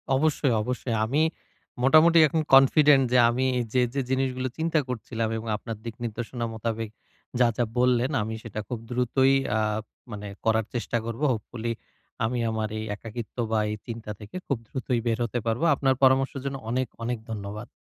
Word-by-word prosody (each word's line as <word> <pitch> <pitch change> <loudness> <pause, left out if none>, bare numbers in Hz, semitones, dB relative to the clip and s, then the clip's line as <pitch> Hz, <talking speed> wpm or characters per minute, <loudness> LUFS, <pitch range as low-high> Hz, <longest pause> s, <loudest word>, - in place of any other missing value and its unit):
অবশ্যই, 140 -2 +2
অবশ্যই 125 0 -2
আমি 140 +7 +1 0.6
মোটামুটি 160 +5 +6
এখন 160 +2 0
কনফিডেন্ট 135 +1 +7
যে - - +6
আমি 125 +2 0 0.3
যে, 130 - +4
যে 140 - 0
জিনিসগুলো 130 -1 0
চিন্তা 160 0 +1
করছিলাম 115 -2 -3
এবং 110 - -6
আপনার 115 0 -6
দিক 115 -1 -5
নির্দশনা 120 +1 -4
মোতাবেক 110 0 -3 0.5
যা, 125 - +6
যা 120 - +2 0.2
বললেন 125 +1 +3
আমি 110 +1 -3
সেটা 110 -2 -6
খুব 120 - -4
দ্রুতই 125 +2 +2 0.2
আ - - +2 0.5
মানে 105 -1 -6 0.2
করার 110 -1 +2
চেষ্টা 120 0 -1
করবো। 115 +5 -4
হোপফুলি 115 +1 -4 0.5
আমি 120 +2 -1
আমার 110 -1 -2
এই - - -4
একাকিত্ব 115 +2 -8
বা, 110 - +2
এই - - -2
চিন্তা 115 -2 -6
থেকে 105 - -11
খুব 140 - 0
দ্রুতই 125 0 -2
বের 115 -1 +1
হতে 120 +1 -2
পারব। 115 +4 0
আপনার 135 -1 +2
পরামর্শের 135 +1 +3
জন্য 135 0 -2
অনেক 125 +1 0 0.2
অনেক 120 +1 -1
ধন্যবাদ। 105 +2 -6
120 Hz, 170 wpm, -26 LUFS, 110-130 Hz, 0.6 s, কনফিডেন্ট